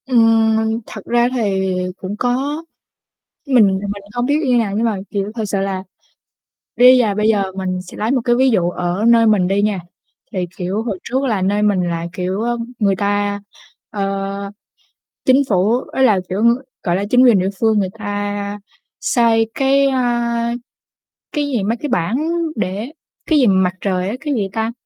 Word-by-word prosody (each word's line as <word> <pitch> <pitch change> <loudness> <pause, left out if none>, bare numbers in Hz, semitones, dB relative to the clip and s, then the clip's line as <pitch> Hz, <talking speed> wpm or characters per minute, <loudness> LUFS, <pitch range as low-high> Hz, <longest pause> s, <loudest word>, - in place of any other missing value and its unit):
Ừm, 225 -2 +3
thật 215 - -8
ra 240 0 +2
thì 190 -5 0 0.2
cũng 195 +2 -5
có, 270 +7 -1 0.8
mình 245 -6 +5
thì 205 - -4
mình 200 0 -5
không 245 0 -1
biết 290 +3 +2
như 250 -2 +3
nào, 215 -4 0
nhưng 225 +2 +1
mà, 220 -3 0
kiểu, 200 0 -3
thật 225 - -2
sự 195 0 -1
là 195 -1 -2 0.9
đi 250 +1 +7
và 210 -3 0
bây 215 +1 +1
giờ 200 -3 +1
mình 185 -1 -3
sẽ 180 - -12
lấy 215 +2 -1
một 265 - +2
cái 240 -1 +3
ví 260 +1 +4
dụ 175 -6 +2
ở 180 +3 -2
nơi 230 -1 +5
mình 205 -5 +3
đi 200 +1 +1
nha. 205 -3 0 0.5
Thì, 185 -2 -2
kiểu, 190 +4 -2
hồi 215 -5 -3
trước 260 +3 -1
là 220 -7 0
nơi 205 +2 +1
mình 205 -3 +2
là, 170 0 -3
kiểu, 185 +3 -3
ơ, 240 +1 -1 0.2
người 200 -3 +2
ta, 205 +1 0 0.5
ơ, 195 0 -3 0.8
chính 260 +2 +5
phủ 195 +2 +2 0.2
ý 265 - +4
là, 215 -7 +4
kiểu, 185 - -2
ưm, 235 +2 +4 0.3
gọi 175 -3 +1
là, 195 - -1
chính 250 +1 +6
quyền 235 -6 +6
địa 185 +1 0
phương 220 -2 +3
người 190 -2 0
ta 205 -1 -3 0.4
xây 225 -2 +2
cái, 275 +1 +3
a, 240 -2 0 0.8
cái 295 -2 -1
gì, 250 -7 -1
mấy 225 +4 0
cái 295 - -5
bảng 180 +2 0 0.4
để 210 +6 -3 0.4
cái 315 - +5
gì 260 - +4
mà 195 - +4
mặt 185 -1 +2
trời 185 -2 -1
á, 210 - -3
cái 295 -1 -2
gì 205 -5 -1
ta? 225 +2 -2
210 Hz, 195 wpm, -18 LUFS, 195-240 Hz, 0.9 s, đi